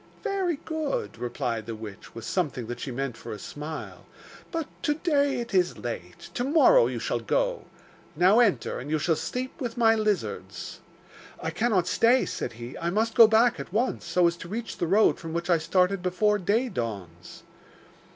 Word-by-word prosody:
'Very 380 -4 0
good,' 290 - -3
replied 120 -2 -3
the 115 - -4
witch, 110 -2 -10
with 115 -1 -7
something 145 -6 -1
that 120 +2 -6
she - - -5
meant 130 0 -3
for - - -9
a 105 - -5
smile, 150 +9 -7 0.4
'but 330 -3 -2 0.2
to 295 - +1
day 285 -5 +1
it 235 -3 -5
is 180 -2 +2
late. 90 -7 -7
To 245 - -1
morrow 330 - +5
you - - -3
shall - - -1
go. - - -1 0.5
Now 185 +8 +5
enter, 185 - +2
and 135 - -7
you 155 - +1
shall 160 +2 +1
sleep 255 - -5
with 240 -2 -4
my 225 -1 +5
lizards.' 215 -3 -2 0.6
'I - - -1
cannot 220 -6 +1
stay,' 235 +7 +3
said - - -4
he. 120 +2 -8
'I 170 - -1
must 220 +5 0
go 230 -2 +9
back 230 +2 +4
at - - -7
once, 230 +6 0
so 175 +1 +2
as 170 0 +2
to 175 - -9
reach 225 +3 -5
the 170 - 0
road 205 +5 +4
from 165 -1 -7
which 170 +2 -1
I 170 - +4
started 180 +3 +1
before 205 +4 +1
day 215 +7 +1
dawns. 100 - -6
185 Hz, 190 wpm, -27 LUFS, -, 0.6 s, go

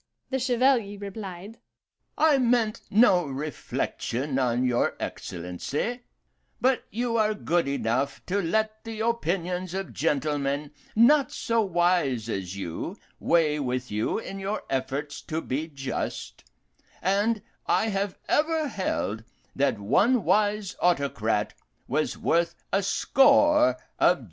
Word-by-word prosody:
To - - -48
this 260 0 0
the 250 - +1
Chevalier 240 -5 +2
replied, 200 0 -8 0.6
'I 305 -3 +4
meant 235 -3 +2
no 195 -6 +5
reflection 135 -1 -3
on 125 -1 +1
your 120 -1 +1
Excellency, 90 - -4 0.6
but 260 0 +2
you 235 +1 -1
are 215 -1 +2
good 175 -6 0
enough 135 +1 -1
to 200 +2 0
let 215 +5 -1
the 225 -1 -5
opinions 185 -5 -1
of 195 -1 -4
gentlemen 145 -1 -1 0.2
not 260 +4 +5
so 230 0 0
wise 175 - +1
as 95 -2 -4
you 85 -4 -5 0.2
weigh 155 -3 +2
with 125 -3 -2
you 105 +2 0
in 195 -3 -6
your 200 +2 -3
efforts 135 +2 -2
to 160 0 -3
be 155 +1 -3
just; 135 - -5 0.5
and 205 +3 +1 0.2
I 220 - +2
have 195 -1 -2
ever 310 0 +1
held 115 - -2 0.3
that 140 0 +1
one 205 - +3
wise 205 +2 +1
autocrat 140 -11 +1 0.3
was - - -1
worth 170 0 +1 0.2
a 195 - +3
score 295 +8 +4 0.2
of - - +5
juries. - - -16
180 Hz, 130 wpm, -26 LUFS, 140-220 Hz, 0.6 s, no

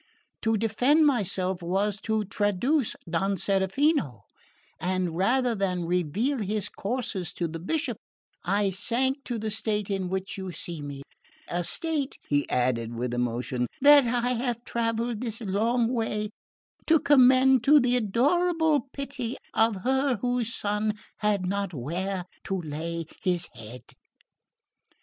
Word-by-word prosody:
To 225 0 +1
defend 250 +9 +3
myself 190 -8 0
was 195 +4 0
to 220 -1 +1
traduce 205 +7 0
Don 190 +4 0
Serafino; 195 - +1 0.6
and 180 0 -1
rather 245 +7 +2
than 185 -4 -1
reveal 180 - 0
his 210 0 -2
courses 200 -5 -3
to 170 - -2
the 165 +1 -6
Bishop 245 - -2 0.5
I 200 +2 +1
sank 260 +8 0
to 240 - -3
the 215 0 -3
state 210 -2 -1
in 190 -2 -1
which 190 +2 -3
you 190 -1 -5
see 170 -1 -3
me; 140 -1 -7 0.4
a 175 +1 -2
state," 300 - 0
he 145 0 0
added 120 -2 0
with 120 +1 -3
emotion, 125 +1 -1
"that 285 -2 +7
I 245 +1 +1
have 240 -1 -2
travelled 230 -1 -2
this 230 -2 -3
long 225 +3 +1
way 215 -3 -1 0.6
to 325 - +6
commend 260 -3 +5
to 295 +1 +7
the 250 -1 +2
adorable 295 - +2
pity 275 -4 -4 0.2
of 220 -4 +2
Her 265 +1 +2
whose 245 +1 -1
Son 210 0 -1 0.2
had 205 -3 0
not 200 -1 -2
where 180 +8 -3 0.2
to 195 -1 -1
lay 165 +1 -4 0.2
His 180 -3 +1
head." 115 +1 -10
210 Hz, 135 wpm, -27 LUFS, 180-245 Hz, 0.6 s, that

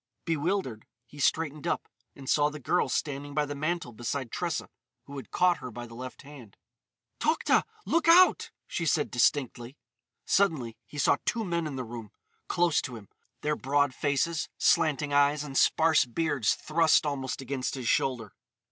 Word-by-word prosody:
Bewildered, 165 - -2 0.2
he 145 +5 -14
straightened 150 +1 0
up; - - -1 0.3
and 135 -1 -11
saw 145 +1 +3
the 150 0 -8
girl 150 +7 +1
standing 145 0 -3
by 150 -1 +2
the 145 - -5
mantel 155 -1 -2
beside 120 +2 -4
Tressa, 170 -3 -2 0.4
who 140 - -11
had 130 - -8
caught 180 -1 +2
her 125 - -7
by 120 +1 -8
the 115 - -13
left 130 +3 -8
hand. 135 -8 -13 0.6
"Tokhta! 315 +1 +2 0.2
Look 335 0 +1
out!" 360 +2 +6 0.2
she 165 - -3
said 150 0 +1
distinctly. 125 0 0 0.5
Suddenly 150 - +1
he 150 - -11
saw 145 - +3
two 230 -2 -1
men 170 -3 -1
in 145 - -5
the 130 - -3
room, 115 -2 -8 0.4
close 175 -3 +2
to 125 -3 -6
him—their 115 +7 -6
broad 140 0 +1
faces, 145 +5 -1
slanting 145 -1 +2
eyes, 145 +1 +3
and 140 -2 -8
sparse 160 +2 +4
beards 135 -2 0
thrust 160 0 +3
almost 135 -3 -3
against 135 -1 -3
his 130 -3 -5
shoulder. 115 -6 0
145 Hz, 165 wpm, -28 LUFS, 130-160 Hz, 0.6 s, out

